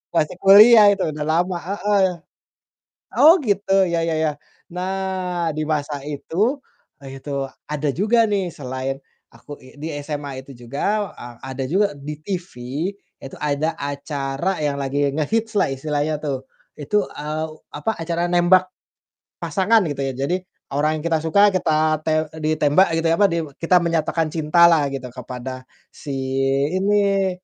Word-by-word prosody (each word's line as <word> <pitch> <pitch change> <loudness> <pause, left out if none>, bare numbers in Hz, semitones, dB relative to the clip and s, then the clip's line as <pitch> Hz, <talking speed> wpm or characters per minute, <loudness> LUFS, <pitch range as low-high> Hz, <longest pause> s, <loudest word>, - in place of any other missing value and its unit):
masih 155 +2 +1
kuliah 210 +2 +8
itu 195 -1 -1
udah 150 -1 -4
lama, 175 +3 +1
heeh. 200 +2 +1 1.1
Oh, 330 +5 +7
gitu 195 -4 +2
ya 170 -1 0
ya 165 -1 0
ya, 155 -1 +1 0.4
nah 185 -1 -2
di 155 - -2
masa 145 -2 -2
itu, 175 - -1 0.4
ah 135 - -10
itu 135 0 -4 0.2
ada 150 0 -2
juga 225 +5 +3
nih 195 -4 -1
selain 130 0 -4 0.4
aku 145 - -11
i 130 - -16
di 155 - -5 0.2
SMA 145 -3 -5
itu 140 - -13 0.2
juga 200 - -1
a 120 -1 -11
ada 135 +1 -5
juga 190 +4 +1
di 145 +2 -7
TV 180 +1 -5 0.7
itu 135 - -9
ada 150 +2 -1
acara 140 +4 -3
yang 145 -1 0
lagi 140 +1 0
ngehits 220 +9 -1
lah - - +2
istilahnya 150 +2 -2
tuh. 135 -3 -3 0.3
Itu, 200 +8 0
eee, 155 +1 -4 0.3
apa, 150 +9 -1
acara 170 +1 -1
nembak 180 +1 +4 0.7
pasangan 215 +3 +3
gitu 145 -2 -3
ya, 135 -1 -1
jadi 175 +6 +1 0.4
orang 155 +2 +1
yang - - -10
kita 165 -1 +2
suka 200 +6 +5
kita 155 -3 +1
te 160 - +1 0.2
eee, 160 - -9
ditembak 155 +5 +3
gitu 165 0 0
ya, - - +4
apa, 205 - +6 0.3
kita 170 +2 +3
menyatakan 165 -1 0
cinta 165 +1 +3
lah 150 -4 +3
gitu 135 -2 -5
kepada 130 +1 -7 0.3
si 145 - -7 0.6
ini 195 0 +2
160 Hz, 150 wpm, -21 LUFS, 145-190 Hz, 1.1 s, kuliah